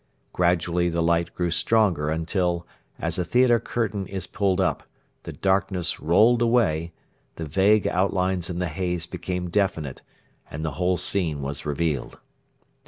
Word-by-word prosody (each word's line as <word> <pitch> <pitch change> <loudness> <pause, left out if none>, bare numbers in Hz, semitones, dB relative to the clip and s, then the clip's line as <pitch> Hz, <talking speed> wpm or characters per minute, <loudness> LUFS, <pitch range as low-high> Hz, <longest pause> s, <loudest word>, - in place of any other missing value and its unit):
Gradually 85 0 +1
the 85 0 0
light 85 0 +1
grew 90 -1 -1
stronger 90 -6 +2
until, 85 +2 -1 0.3
as 85 +2 -2
a - - +1
theatre 120 +6 +3
curtain 105 -5 -2
is 95 -2 -5
pulled 100 -1 0
up, 95 - +1 0.4
the - - -7
darkness 95 -2 0
rolled 110 +9 +4
away, 105 -9 +2 0.4
the 80 - -5
vague 95 +7 +3
outlines 95 -1 0
in 90 - -4
the 90 -1 -1
haze 90 +1 -2
became 90 0 -4
definite, 90 -9 -1 0.5
and 80 +2 -5
the 80 - -1
whole 90 +5 0
scene 80 -9 0
was 70 +2 -5
revealed. 75 -2 -2
90 Hz, 145 wpm, -24 LUFS, 85-95 Hz, 0.5 s, rolled